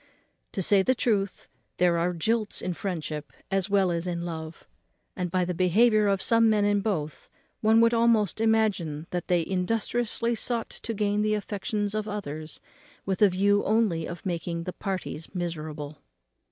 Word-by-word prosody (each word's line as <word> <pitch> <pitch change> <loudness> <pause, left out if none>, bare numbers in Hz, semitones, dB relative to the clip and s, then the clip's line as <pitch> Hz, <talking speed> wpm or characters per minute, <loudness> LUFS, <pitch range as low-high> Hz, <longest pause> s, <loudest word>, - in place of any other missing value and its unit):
To 190 - -1
say 200 +2 +5
the 255 +7 +2
truth, 205 -5 -1 0.3
there 175 -1 +3
are 175 +2 +1
jilts 215 +6 -1
in 180 - -2
friendship 160 -5 -4 0.2
as 195 0 +1
well 195 -2 +3
as 170 +1 -2
in 170 -1 -2
love; 160 -1 -7 0.5
and, 180 -1 -2
by 180 +1 +1
the 180 - -2
behaviour 210 +5 +4
of 195 -1 +1
some 230 -1 +4
men 210 -2 +3
in 205 0 +2
both, 155 -9 -3 0.3
one 220 +1 +4
would 230 0 +4
almost 230 -3 +2
imagine 205 -9 +1
that 175 -1 -3
they 175 -2 +2
industriously 225 +5 0
sought 230 0 -1
to 230 - -4
gain 205 0 +1
the 215 0 +2
affections 205 0 -2
of 215 0 -2
others 155 -7 -5 0.5
with 190 0 -2
a 205 - +7
view 200 +2 +2
only 205 -7 +1
of 170 +2 -8
making 170 -1 -3
the 180 - -5
parties 185 -3 -5
miserable. 155 -4 -5
195 Hz, 165 wpm, -27 LUFS, 170-215 Hz, 0.5 s, a